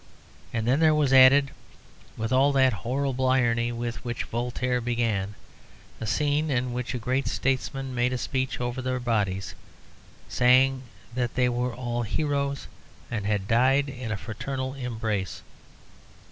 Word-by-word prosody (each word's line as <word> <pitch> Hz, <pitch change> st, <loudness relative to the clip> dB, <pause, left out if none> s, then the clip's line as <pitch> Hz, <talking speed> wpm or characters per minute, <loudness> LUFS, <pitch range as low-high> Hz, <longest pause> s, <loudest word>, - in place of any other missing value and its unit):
And 115 Hz, -1 st, -2 dB
then 130 Hz, +4 st, +3 dB
there 155 Hz, -1 st, +5 dB
was 145 Hz, -3 st, +2 dB
added, 135 Hz, +1 st, +7 dB, 0.7 s
with 110 Hz, +2 st, -2 dB
all 135 Hz, +2 st, +4 dB
that 130 Hz, -2 st, +4 dB
horrible 130 Hz, +6 st, -1 dB
irony 120 Hz, -2 st, +2 dB
which 120 Hz, 0 st, -4 dB
Voltaire 125 Hz, +1 st, -2 dB
began, 115 Hz, -5 st, -1 dB, 0.6 s
a 110 Hz, -, -4 dB
scene 150 Hz, +5 st, +1 dB
in 125 Hz, -2 st, 0 dB
which 125 Hz, +1 st, -3 dB
a -, -, -1 dB
great 130 Hz, +3 st, -1 dB
statesman 135 Hz, 0 st, -1 dB
made 125 Hz, 0 st, +1 dB
a 130 Hz, -, -1 dB
speech 130 Hz, +1 st, -2 dB
over 120 Hz, +1 st, -3 dB
their 130 Hz, 0 st, -2 dB
bodies, 105 Hz, -6 st, -1 dB, 0.7 s
saying 130 Hz, +1 st, +4 dB, 0.3 s
that 125 Hz, -1 st, -2 dB
they 125 Hz, -1 st, +3 dB
were 125 Hz, 0 st, -2 dB
all 120 Hz, -1 st, -3 dB
heroes 140 Hz, +3 st, -1 dB, 0.5 s
and 105 Hz, -4 st, -2 dB
had 100 Hz, -2 st, -1 dB
died 130 Hz, +5 st, +3 dB
in 125 Hz, -4 st, -6 dB
a 110 Hz, -, -1 dB
fraternal 130 Hz, +5 st, -4 dB
embrace. 110 Hz, -9 st, -3 dB
125 Hz, 145 wpm, -26 LUFS, 115-130 Hz, 0.7 s, added